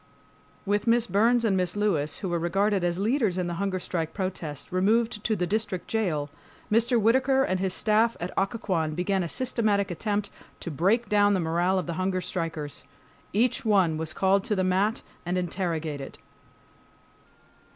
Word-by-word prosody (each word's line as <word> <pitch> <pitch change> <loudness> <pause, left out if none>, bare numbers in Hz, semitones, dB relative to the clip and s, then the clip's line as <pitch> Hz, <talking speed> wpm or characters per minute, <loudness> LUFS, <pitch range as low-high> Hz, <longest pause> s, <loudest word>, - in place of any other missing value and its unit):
With 205 +2 0
Miss 230 0 +4
Burns 230 +5 +3
and 200 -3 +2
Mrs. 180 -1 0
Lewis, 185 -8 0
who 190 - -4
were 170 -1 0
regarded 195 +3 +1
as 175 0 0
leaders 215 -2 +1
in 180 - 0
the 175 - -3
hunger 195 -2 0
strike 165 -3 -3
protest, 175 -7 -4
removed 210 +4 +1
to 220 - +1
the 180 -3 -1
district 200 -2 -2
jail, 160 -10 -1 0.4
Mr. 235 +2 +3
Whittaker 260 +5 +3
and 185 -6 0
his 190 0 0
staff 225 +1 +2
at 175 +2 -4
Occoquan 190 -7 -1
began 190 +2 0
a 170 - -3
systematic 215 -6 0
attempt 205 +3 -2 0.3
to 170 - -5
break 200 - +1
down 205 -1 +4
the - - +1
morale 175 +3 +1
of 185 - -1
the 170 - -3
hunger 185 0 0
strikers. 165 -5 -4 0.5
Each 230 +4 +1
one 190 -7 +3
was 160 0 -4
called 195 +2 +2
to 210 - 0
the 190 - +1
mat 195 +5 +1 0.2
and 175 +2 -2
interrogated. 165 -6 -3
190 Hz, 170 wpm, -26 LUFS, 175-215 Hz, 0.5 s, Miss